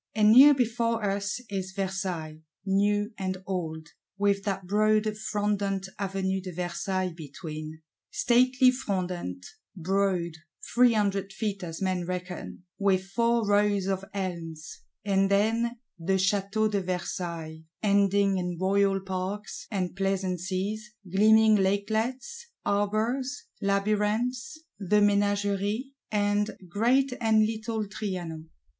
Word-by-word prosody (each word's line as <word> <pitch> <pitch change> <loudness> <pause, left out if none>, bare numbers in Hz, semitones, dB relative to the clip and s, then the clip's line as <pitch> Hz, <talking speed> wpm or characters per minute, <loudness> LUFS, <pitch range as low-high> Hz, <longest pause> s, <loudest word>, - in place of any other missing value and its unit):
And 215 -1 +5
near 275 +5 +9
before 230 -2 0
us 200 +3 -1
is 190 -2 -4
Versailles, 185 -5 -3 0.3
New 205 +2 +1
and 185 -1 -2
Old; 160 -4 -4 0.3
with 200 -1 +1
that 195 -2 -2
broad 215 +2 +3
frondent 205 -2 -1
Avenue 190 -1 -1
de 185 0 -6
Versailles 180 +1 -2
between,—stately 160 - 0
frondent, 180 - -3 0.3
broad, 185 -1 0 0.4
three 245 -1 +6
hundred 200 -2 0
feet 200 -2 -3
as 165 +2 -5
men 185 -2 -1
reckon, 180 0 -5 0.2
with 190 -1 +1
four 235 0 +2
Rows 205 -1 +3
of 195 0 -1
Elms; 165 -7 -5 0.3
and 195 -1 +2
then 225 +4 +1 0.2
the 175 +4 0
Château 200 +3 +1
de 200 -2 +1
Versailles, 170 -3 -4 0.2
ending 200 -1 +3
in 180 -1 -3
royal 195 +1 +2
Parks 190 +2 -5
and 185 -4 -2
Pleasances, 195 +2 -2 0.2
gleaming 220 +2 +6
lakelets, 220 - -1 0.2
arbours, 220 +7 0 0.2
Labyrinths, 215 +9 0 0.2
the 200 +1 0
Ménagerie, 205 +3 +1 0.2
and 205 0 +1
Great 250 +8 +2
and 220 -1 +4
Little 220 0 -2
Trianon. 175 -6 -5
200 Hz, 110 wpm, -27 LUFS, 185-215 Hz, 0.4 s, near